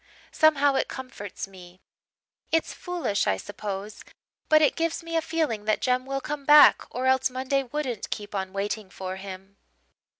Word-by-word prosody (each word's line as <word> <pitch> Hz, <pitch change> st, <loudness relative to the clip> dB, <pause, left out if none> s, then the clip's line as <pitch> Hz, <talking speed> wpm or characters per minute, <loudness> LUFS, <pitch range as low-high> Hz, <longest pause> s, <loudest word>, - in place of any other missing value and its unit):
Somehow 290 Hz, -3 st, +4 dB
it 265 Hz, -, 0 dB
comforts 255 Hz, -8 st, -7 dB
me: 180 Hz, -2 st, -14 dB, 0.7 s
it's 325 Hz, 0 st, +1 dB
foolish, 340 Hz, -, -2 dB
I 95 Hz, -, +2 dB
suppose, 200 Hz, -, -6 dB, 0.5 s
but 310 Hz, -, +7 dB
it 300 Hz, -2 st, +3 dB
gives 330 Hz, 0 st, -1 dB
me 330 Hz, 0 st, -5 dB
a 325 Hz, -, +3 dB
feeling 310 Hz, -11 st, -2 dB
that 215 Hz, 0 st, +2 dB
Jem 255 Hz, 0 st, 0 dB
will 275 Hz, 0 st, -2 dB
come 295 Hz, +1 st, -5 dB
back 295 Hz, +1 st, +7 dB
or 250 Hz, +2 st, -3 dB
else 260 Hz, 0 st, +3 dB
Monday 260 Hz, +2 st, 0 dB
wouldn't 260 Hz, -4 st, -4 dB
keep 205 Hz, -1 st, -5 dB
on 190 Hz, -1 st, -3 dB
waiting 200 Hz, +1 st, -3 dB
for 185 Hz, 0 st, -6 dB
him. 195 Hz, 0 st, -10 dB
255 Hz, 165 wpm, -26 LUFS, 200-295 Hz, 0.7 s, but